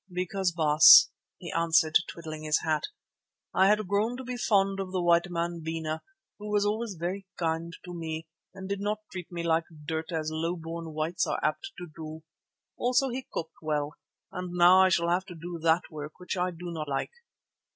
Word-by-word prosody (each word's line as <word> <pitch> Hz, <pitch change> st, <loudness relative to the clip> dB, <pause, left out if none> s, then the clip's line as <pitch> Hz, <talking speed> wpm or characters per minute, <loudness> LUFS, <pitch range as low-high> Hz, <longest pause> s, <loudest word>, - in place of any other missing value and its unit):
"Because, 180 Hz, +1 st, -1 dB
Baas," 155 Hz, -2 st, +8 dB, 0.3 s
he -, -, -7 dB
answered, 165 Hz, -1 st, +3 dB
twiddling 155 Hz, -2 st, -7 dB
his 155 Hz, 0 st, +1 dB
hat, 155 Hz, -2 st, 0 dB, 0.7 s
"I 190 Hz, +1 st, +5 dB
had 210 Hz, -1 st, +2 dB
grown 210 Hz, +5 st, 0 dB
to 260 Hz, -, -7 dB
be 250 Hz, 0 st, -5 dB
fond 195 Hz, -4 st, +2 dB
of 190 Hz, -1 st, -4 dB
the 185 Hz, -, -1 dB
white 170 Hz, 0 st, +3 dB
man, 170 Hz, -1 st, -2 dB
Bena, 160 Hz, -1 st, -3 dB, 0.4 s
who 210 Hz, 0 st, -7 dB
was 205 Hz, -1 st, +2 dB
always 215 Hz, 0 st, -1 dB
very 185 Hz, +4 st, -4 dB
kind 165 Hz, 0 st, -1 dB
to 180 Hz, -, -7 dB
me 160 Hz, -1 st, -5 dB, 0.3 s
and 190 Hz, 0 st, -8 dB
did 200 Hz, 0 st, -3 dB
not 210 Hz, +1 st, -1 dB
treat 180 Hz, -2 st, -7 dB
me 170 Hz, -1 st, -4 dB
like 165 Hz, 0 st, +2 dB, 0.2 s
dirt 160 Hz, +2 st, -3 dB
as 155 Hz, -1 st, -2 dB
low 165 Hz, +2 st, -1 dB
born 165 Hz, -1 st, -7 dB
whites 160 Hz, +3 st, 0 dB
are -, -, -1 dB
apt 390 Hz, 0 st, -1 dB
to 180 Hz, -, -6 dB
do. 160 Hz, -1 st, -8 dB, 0.5 s
Also 250 Hz, +2 st, +2 dB
he 255 Hz, +1 st, -5 dB
cooked 160 Hz, -1 st, -6 dB
well, 150 Hz, -2 st, -1 dB, 0.4 s
and 180 Hz, -1 st, -5 dB
now 180 Hz, +1 st, +7 dB
I 190 Hz, -, +6 dB
shall 170 Hz, -1 st, +2 dB
have 180 Hz, +2 st, +1 dB
to 175 Hz, -, -9 dB
do 170 Hz, +1 st, -7 dB
that 165 Hz, +2 st, +2 dB
work 150 Hz, -1 st, -7 dB
which 180 Hz, -, -4 dB
I 180 Hz, 0 st, 0 dB
do 175 Hz, 0 st, -7 dB
not 155 Hz, -2 st, -4 dB
like." 135 Hz, -1 st, -2 dB
170 Hz, 195 wpm, -28 LUFS, 160-190 Hz, 0.7 s, Baas